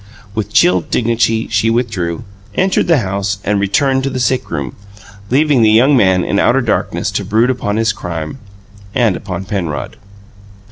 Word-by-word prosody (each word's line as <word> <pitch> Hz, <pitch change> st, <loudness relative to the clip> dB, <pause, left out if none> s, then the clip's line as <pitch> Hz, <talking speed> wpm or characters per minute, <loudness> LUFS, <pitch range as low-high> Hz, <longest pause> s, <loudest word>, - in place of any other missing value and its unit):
With 105 Hz, -2 st, -3 dB
chill 90 Hz, -2 st, +4 dB
dignity 115 Hz, +3 st, 0 dB
she 110 Hz, +1 st, +2 dB
withdrew, 105 Hz, -9 st, -2 dB, 0.3 s
entered 190 Hz, 0 st, +1 dB
the 165 Hz, -2 st, +4 dB
house, 100 Hz, +1 st, -2 dB
and 105 Hz, 0 st, 0 dB
returned 130 Hz, +7 st, +1 dB
to 135 Hz, -, -2 dB
the 130 Hz, -, -4 dB
sick 130 Hz, +1 st, 0 dB
room, 70 Hz, -5 st, -4 dB, 0.5 s
leaving 145 Hz, 0 st, +3 dB
the 110 Hz, -, +5 dB
young 125 Hz, +7 st, +5 dB
man 95 Hz, -6 st, +3 dB
in 100 Hz, -, 0 dB
outer 135 Hz, +2 st, +3 dB
darkness 115 Hz, -4 st, -1 dB
to -, -, -2 dB
brood 115 Hz, +4 st, +2 dB
upon 110 Hz, -5 st, -2 dB
his 110 Hz, -1 st, +1 dB
crime 85 Hz, -, -6 dB, 0.6 s
and 115 Hz, -6 st, +2 dB
upon 95 Hz, -1 st, -6 dB
Penrod. 90 Hz, -7 st, -4 dB
110 Hz, 160 wpm, -15 LUFS, 95-125 Hz, 0.6 s, the